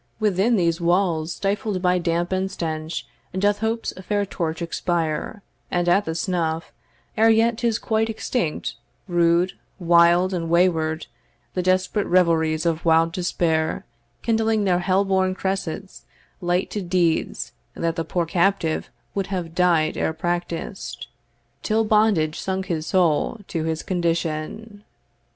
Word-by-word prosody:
Within 210 Hz, +2 st, +2 dB
these 170 Hz, -3 st, +1 dB
walls, 170 Hz, -2 st, +1 dB
stifled 200 Hz, 0 st, -1 dB
by 180 Hz, 0 st, +2 dB
damp 170 Hz, +1 st, -1 dB
and 190 Hz, 0 st, 0 dB
stench, 160 Hz, -2 st, -4 dB, 0.3 s
Doth 205 Hz, +2 st, +2 dB
Hope's 225 Hz, +1 st, -1 dB
fair 205 Hz, +1 st, 0 dB
torch 165 Hz, -4 st, -3 dB
expire; 170 Hz, +3 st, -2 dB, 0.3 s
and 175 Hz, 0 st, 0 dB
at 195 Hz, +4 st, +4 dB
the 160 Hz, -, -3 dB
snuff, 165 Hz, -2 st, -2 dB, 0.4 s
Ere 225 Hz, +1 st, +5 dB
yet 225 Hz, +1 st, +3 dB
'tis 235 Hz, -3 st, +1 dB
quite 220 Hz, 0 st, 0 dB
extinct, 220 Hz, -6 st, -2 dB, 0.3 s
rude, 175 Hz, 0 st, +3 dB, 0.3 s
wild, 175 Hz, +1 st, +4 dB
and 165 Hz, -2 st, -2 dB
way 175 Hz, +2 st, +5 dB
ward, 160 Hz, -1 st, -2 dB, 0.5 s
The 180 Hz, -, 0 dB
desperate 185 Hz, +3 st, +1 dB
revelries 165 Hz, -3 st, +2 dB
of 165 Hz, -1 st, 0 dB
wild 165 Hz, 0 st, +4 dB
despair, 165 Hz, -2 st, 0 dB, 0.4 s
Kindling 225 Hz, -2 st, +2 dB
their 180 Hz, -3 st, +2 dB
hell 190 Hz, +2 st, +2 dB
born 190 Hz, -1 st, +1 dB
cressets, 190 Hz, -1 st, -4 dB, 0.4 s
light 175 Hz, +1 st, 0 dB
to 210 Hz, -, -2 dB
deeds 175 Hz, -2 st, 0 dB, 0.2 s
That 165 Hz, -1 st, -1 dB
the 165 Hz, -, -1 dB
poor 175 Hz, +1 st, -1 dB
captive 170 Hz, -1 st, +1 dB, 0.2 s
would 195 Hz, -2 st, -2 dB
have 180 Hz, -4 st, -4 dB
died 170 Hz, -3 st, +2 dB
ere 160 Hz, -, 0 dB
practised, 175 Hz, +3 st, -4 dB, 0.6 s
Till 220 Hz, +1 st, +1 dB
bondage 210 Hz, -8 st, +2 dB
sunk 190 Hz, 0 st, -2 dB
his 165 Hz, -4 st, -3 dB
soul 185 Hz, +4 st, +1 dB
to 160 Hz, -2 st, -2 dB
his 160 Hz, -1 st, -2 dB
condition. 175 Hz, +4 st, -2 dB
180 Hz, 135 wpm, -23 LUFS, 165-195 Hz, 0.6 s, Ere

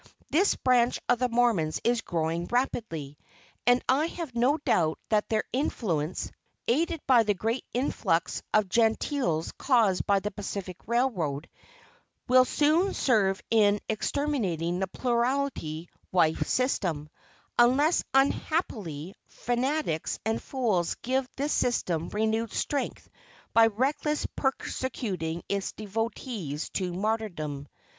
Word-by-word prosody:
This 375 Hz, +6 st, +3 dB
branch 245 Hz, -1 st, +2 dB
of 245 Hz, -1 st, +3 dB
the 250 Hz, 0 st, +1 dB
Mormons 230 Hz, -10 st, +2 dB
is 240 Hz, -1 st, +2 dB
growing 165 Hz, -1 st, -2 dB
rapidly; 165 Hz, -, -2 dB, 0.5 s
and 245 Hz, 0 st, +5 dB
I 285 Hz, +5 st, +3 dB
have 335 Hz, -6 st, -6 dB
no 250 Hz, +6 st, +3 dB
doubt 160 Hz, -, +1 dB
that 215 Hz, -1 st, +1 dB
their 220 Hz, -1 st, +1 dB
influence, 185 Hz, -, -1 dB, 0.4 s
aided 320 Hz, +5 st, +1 dB
by 250 Hz, -3 st, +6 dB
the 210 Hz, -2 st, +1 dB
great 225 Hz, +6 st, -2 dB
influx 235 Hz, -9 st, 0 dB
of 215 Hz, -2 st, +3 dB
Gentiles 225 Hz, -, +1 dB
caused 225 Hz, -9 st, +2 dB
by 200 Hz, -1 st, +4 dB
the 210 Hz, +2 st, -4 dB
Pacific 195 Hz, -3 st, -5 dB
Railroad, 185 Hz, -, 0 dB, 0.8 s
will 255 Hz, 0 st, +6 dB
soon 310 Hz, +8 st, +2 dB
serve 200 Hz, -6 st, +2 dB
in 210 Hz, -2 st, +4 dB
exterminating 205 Hz, -, -1 dB
the 190 Hz, -, 0 dB
plurality 235 Hz, -, -1 dB, 0.2 s
wife 165 Hz, -3 st, +2 dB
system 180 Hz, -, 0 dB, 0.5 s
unless, 270 Hz, +7 st, +4 dB
unhappily, 215 Hz, -, 0 dB
fanatics 245 Hz, -, -1 dB
and 225 Hz, +1 st, 0 dB
fools 215 Hz, -10 st, 0 dB
give 260 Hz, +1 st, 0 dB
this 285 Hz, +3 st, -1 dB
system 175 Hz, -9 st, 0 dB
renewed 220 Hz, +1 st, 0 dB
strength 285 Hz, -2 st, -2 dB, 0.5 s
by 225 Hz, 0 st, +7 dB
recklessly 275 Hz, +7 st, -1 dB
persecuting 200 Hz, -, -2 dB
its 200 Hz, -1 st, -2 dB
devotees 215 Hz, -, -4 dB
to 185 Hz, -2 st, -2 dB
martyrdom. 175 Hz, -8 st, -3 dB
225 Hz, 115 wpm, -28 LUFS, 180-255 Hz, 0.8 s, by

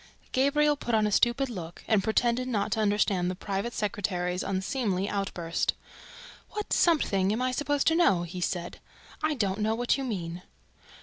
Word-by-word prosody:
Gabriel 295 Hz, +3 st, +3 dB
put 240 Hz, -5 st, -1 dB
on 215 Hz, -1 st, +3 dB
a 210 Hz, -, 0 dB
stupid 240 Hz, +6 st, +3 dB
look 175 Hz, -8 st, -8 dB
and 210 Hz, -3 st, +3 dB
pretended 240 Hz, +3 st, +1 dB
not 215 Hz, -4 st, -1 dB
to 220 Hz, -, 0 dB
understand 205 Hz, -4 st, +2 dB
the 185 Hz, -, -3 dB
private 200 Hz, +4 st, -3 dB
secretary's 185 Hz, -5 st, -2 dB
unseemly 195 Hz, -1 st, -1 dB
outburst. 180 Hz, -5 st, -1 dB, 0.7 s
"What 420 Hz, -1 st, -3 dB
'something' 200 Hz, -, +3 dB
am 220 Hz, -, -1 dB
I 255 Hz, -, +1 dB
supposed 290 Hz, +2 st, 0 dB
to 325 Hz, -, +4 dB
know?" 195 Hz, -, +4 dB
he 175 Hz, +1 st, -6 dB
said. 175 Hz, -1 st, -3 dB, 0.4 s
"I 310 Hz, -1 st, +1 dB
don't 200 Hz, -5 st, -1 dB
know 220 Hz, +1 st, +1 dB
what 245 Hz, +3 st, +1 dB
you -, -, -2 dB
mean." 180 Hz, -8 st, -4 dB
210 Hz, 170 wpm, -28 LUFS, 185-255 Hz, 0.7 s, to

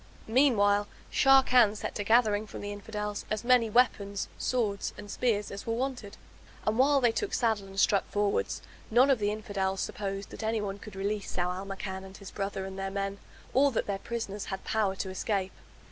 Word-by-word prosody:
Meanwhile 205 Hz, -5 st, +3 dB, 0.2 s
Sharrkan 255 Hz, -5 st, +5 dB
set -, -, -4 dB
to 205 Hz, -, -3 dB
gathering 215 Hz, -1 st, +3 dB
from -, -, -8 dB
the 205 Hz, -, -4 dB
Infidels 210 Hz, 0 st, -4 dB
as 215 Hz, +1 st, -2 dB
many 240 Hz, -2 st, +4 dB
weapons, 200 Hz, -4 st, +1 dB
swords, 215 Hz, -6 st, -1 dB
and 205 Hz, -1 st, -8 dB
spears, 210 Hz, -5 st, 0 dB
as 200 Hz, -, -7 dB
were 230 Hz, -, 0 dB
wanted. 250 Hz, -5 st, -4 dB, 0.5 s
And 215 Hz, +3 st, +1 dB
while 280 Hz, +1 st, +5 dB
they 240 Hz, -2 st, +4 dB
took 405 Hz, -, -2 dB
saddle 220 Hz, -5 st, +1 dB
and 195 Hz, 0 st, -6 dB
struck 200 Hz, 0 st, +3 dB
forwards 205 Hz, 0 st, -1 dB, 0.3 s
none 250 Hz, +5 st, +5 dB
of 260 Hz, -, +3 dB
the 205 Hz, -1 st, +1 dB
Infidels 195 Hz, -3 st, -2 dB
supposed 195 Hz, -1 st, -4 dB
that -, -, -8 dB
anyone 210 Hz, -3 st, -2 dB
could 210 Hz, -1 st, -11 dB
release 200 Hz, +1 st, -2 dB
Zau 180 Hz, 0 st, 0 dB
al 190 Hz, +2 st, -6 dB
Makan 190 Hz, -1 st, -5 dB
and 190 Hz, 0 st, -11 dB
his 200 Hz, -1 st, -10 dB
brother 195 Hz, -1 st, -3 dB
and 190 Hz, 0 st, -7 dB
their 195 Hz, 0 st, -2 dB
men; 195 Hz, 0 st, -3 dB, 0.3 s
or 280 Hz, +2 st, +5 dB
that -, -, 0 dB
their 200 Hz, -1 st, -2 dB
prisoners 210 Hz, -3 st, -4 dB
had 190 Hz, 0 st, -5 dB
power 210 Hz, -3 st, 0 dB
to 190 Hz, 0 st, -4 dB
escape. 190 Hz, 0 st, -1 dB
205 Hz, 190 wpm, -29 LUFS, 195-230 Hz, 0.5 s, Sharrkan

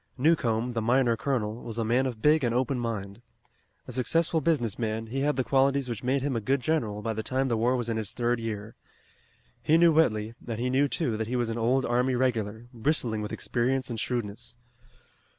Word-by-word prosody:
Newcomb, 125 Hz, -5 st, +2 dB
the 115 Hz, -, -1 dB
miner 120 Hz, +1 st, +3 dB
colonel, 115 Hz, -3 st, -2 dB
was 115 Hz, -1 st, -6 dB
a 115 Hz, -, 0 dB
man 125 Hz, +4 st, +2 dB
of 115 Hz, -4 st, -6 dB
big 155 Hz, 0 st, +4 dB
and 120 Hz, -1 st, +1 dB
open 130 Hz, +1 st, 0 dB
mind. 105 Hz, -3 st, -4 dB, 0.7 s
A -, -, -6 dB
successful 160 Hz, +6 st, +1 dB
business 125 Hz, -, 0 dB
man, 110 Hz, -1 st, -2 dB
he 125 Hz, +5 st, -4 dB
had 145 Hz, +2 st, +1 dB
the 130 Hz, -, 0 dB
qualities 135 Hz, +2 st, +2 dB
which 115 Hz, -4 st, -4 dB
made 130 Hz, +2 st, +1 dB
him 140 Hz, -3 st, -1 dB
a 115 Hz, -, -1 dB
good 135 Hz, +6 st, +1 dB
general 115 Hz, -8 st, -1 dB
by 115 Hz, -, -1 dB
the 110 Hz, -, -3 dB
time 130 Hz, +4 st, -1 dB
the 115 Hz, -, +1 dB
war 120 Hz, +3 st, +2 dB
was 120 Hz, -2 st, -2 dB
in 115 Hz, -1 st, -1 dB
its 110 Hz, -1 st, -2 dB
third 120 Hz, 0 st, 0 dB
year. 110 Hz, -1 st, -5 dB, 0.9 s
He 160 Hz, -, +4 dB
knew 170 Hz, 0 st, +6 dB
Whitley 110 Hz, -8 st, +2 dB
and 115 Hz, -2 st, -3 dB
he 125 Hz, +1 st, 0 dB
knew, 140 Hz, +2 st, +3 dB
too, 130 Hz, -6 st, -1 dB
that 110 Hz, 0 st, -2 dB
he 125 Hz, -, -2 dB
was 120 Hz, -2 st, 0 dB
an 115 Hz, +1 st, -3 dB
old 125 Hz, +3 st, +2 dB
army 125 Hz, +2 st, +1 dB
regular, 115 Hz, -3 st, -1 dB
bristling 115 Hz, -3 st, 0 dB
with 105 Hz, -, -5 dB
experience 130 Hz, +2 st, -1 dB
and 115 Hz, -, -3 dB
shrewdness. 115 Hz, -1 st, -3 dB
120 Hz, 215 wpm, -27 LUFS, 110-135 Hz, 0.9 s, knew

